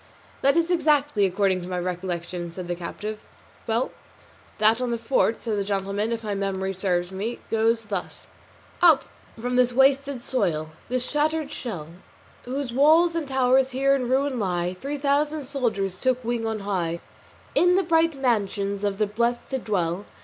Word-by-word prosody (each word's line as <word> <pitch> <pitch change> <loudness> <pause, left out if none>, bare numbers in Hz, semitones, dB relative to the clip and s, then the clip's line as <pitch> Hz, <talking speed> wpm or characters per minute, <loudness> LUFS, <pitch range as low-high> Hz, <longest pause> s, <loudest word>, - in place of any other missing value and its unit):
"That 275 +2 +4
is 335 +1 +2
it - - +5
exactly, 290 - +3
according 190 0 +1
to 175 - -7
my 180 -1 -3
recollection," 175 -1 -4
said 180 +1 -7
the 175 - -1
captive. 210 +5 -6 0.5
"Well 230 +3 0 0.7
then, 215 +1 +6
that 230 - -7
on 250 - -1
the 235 - 0
fort," 230 -1 +1
said 215 -3 -1
the - - 0
gentleman, 200 +2 -1
"if 230 -1 -3
my 210 -1 -2
memory 195 -1 -2
serves 180 -1 -1
me, 210 +5 -3
goes 225 0 +2
thus: 195 -3 -4 0.5
SONNET 345 -2 +8
"Up 270 -2 -6 0.4
from 245 +2 -1
this 250 -1 +4
wasted 270 0 +3
soil, 155 -12 -1 0.2
this 255 0 -1
shattered 305 0 0
shell, 175 -11 -5 0.6
Whose 260 0 -3
walls 320 +6 +5
and 330 -3 -2
towers 265 0 +3
here 275 +1 +4
in 250 -3 -2
ruin 265 0 +1
lie, 180 -3 -1
Three 285 +2 -3
thousand 290 +2 +1
soldier 245 -8 0
souls 185 -1 -9
took 255 -1 +1
wing 230 -1 -1
on 220 -1 -2
high, 175 -4 -2 0.5
In 355 +1 +4
the 385 - +3
bright 330 -2 +3
mansions 200 -5 0
of 200 -1 0
the 215 - +2
blest 235 +4 -1
to 265 - -1
dwell. 190 -4 -1
230 Hz, 180 wpm, -25 LUFS, 195-270 Hz, 0.7 s, SONNET